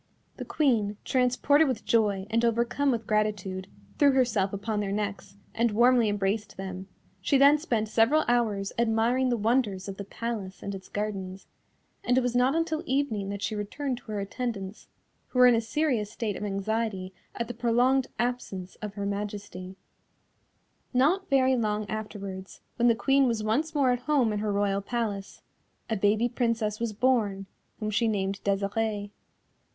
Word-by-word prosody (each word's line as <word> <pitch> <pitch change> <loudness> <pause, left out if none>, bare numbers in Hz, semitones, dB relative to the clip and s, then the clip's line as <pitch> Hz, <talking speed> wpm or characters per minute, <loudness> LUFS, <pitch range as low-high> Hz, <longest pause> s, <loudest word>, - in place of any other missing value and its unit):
The - - -6
Queen, 220 -9 +1
transported 265 +4 +3
with 255 -4 -3
joy, 205 -4 +2
and 230 +1 +2
overcome 235 +5 +1
with 230 -4 0
gratitude, 205 -3 -1 0.3
threw 285 -2 +5
herself 220 -7 +2
upon 205 +2 -2
their 200 -1 -2
necks, 200 -1 -4 0.2
and 230 +1 +2
warmly 235 +1 +4
embraced 205 0 -1
them; 190 0 -6 0.3
she 275 +9 +3
then 285 +2 +6
spent 230 -8 -1
several 230 +8 +3
hours 220 -5 +1
admiring 235 +3 +2
the 240 - +1
wonders 215 -4 0
of 195 -1 -6
the 200 - -5
palace 205 -2 -5
and 200 - -4
its 190 -1 -9
gardens, 195 -2 -4 0.6
and 245 +1 +2
it - - +5
was 245 -1 -1
not 255 +4 +3
until 325 -1 0
evening 260 -9 0
that 200 0 -5
she - - -1
returned 245 +6 -3
to - - -26
her 210 - -2
attendants, 200 -1 -5 0.4
who - - -6
were 250 - +8
in 245 - +7
a 230 - +2
serious 230 -3 0
state 215 -3 -3
of - - -6
anxiety 200 -1 -2 0.2
at 235 - -3
the 240 - -5
prolonged 245 +3 +2
absence 230 -6 -3
of 210 -2 -7
Her 200 -1 -3
Majesty. 200 -2 -5 1.2
Not 330 +10 +2
very 265 -2 +4
long 210 -3 -1
afterwards, 200 -3 -6 0.2
when 240 0 +3
the 230 - +5
Queen 270 +3 +3
was 230 -3 -1
once 300 +9 0
more 270 -3 +3
at 245 - 0
home 255 -8 +3
in 210 - -1
her 210 0 -1
Royal 200 0 +1
Palace, 205 -3 -4 0.5
a - - +2
baby 210 +3 +2
Princess 230 -3 -1
was 235 -1 -1
born, 210 -4 +1 0.3
whom 215 -1 -2
she 230 +2 +2
named 195 -2 -1
Desirée. 205 +1 -1
220 Hz, 170 wpm, -27 LUFS, 200-245 Hz, 1.2 s, were